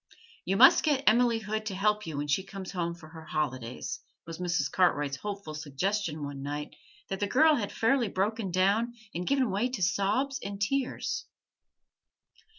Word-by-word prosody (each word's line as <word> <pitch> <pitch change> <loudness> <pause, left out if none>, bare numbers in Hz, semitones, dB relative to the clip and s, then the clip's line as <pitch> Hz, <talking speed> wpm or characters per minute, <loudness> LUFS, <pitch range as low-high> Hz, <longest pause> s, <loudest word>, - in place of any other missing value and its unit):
'You - - +1
must - - +8
get 285 -4 +2
Emily 235 +1 +4
Hood 215 0 -3
to 195 - -3
help 210 +1 +1
you 155 -3 -4
when 145 +1 -2
she 145 +6 +2
comes 195 -1 -8
home 170 -3 -2
for 160 -2 -14
her 160 0 -11
holidays,' 130 -6 -3 0.3
was 165 0 -8
Mrs. 175 -5 0
Cartwright's 145 -6 +2
hopeful 200 -5 -6
suggestion 155 +2 -2
one 140 -1 -5
night 145 +1 -5 0.3
that 195 - -3
the 205 - 0
girl 310 +8 +5
had 220 -8 -1
fairly 240 +1 +2
broken 200 +2 -1
down 200 +6 +2 0.2
and 175 +2 -4
given 265 -5 +2
way 210 +6 0
to 230 -7 -3
sobs 205 +9 +1
and 200 0 -5
tears. 265 +5 -1
195 Hz, 170 wpm, -29 LUFS, 160-220 Hz, 0.3 s, must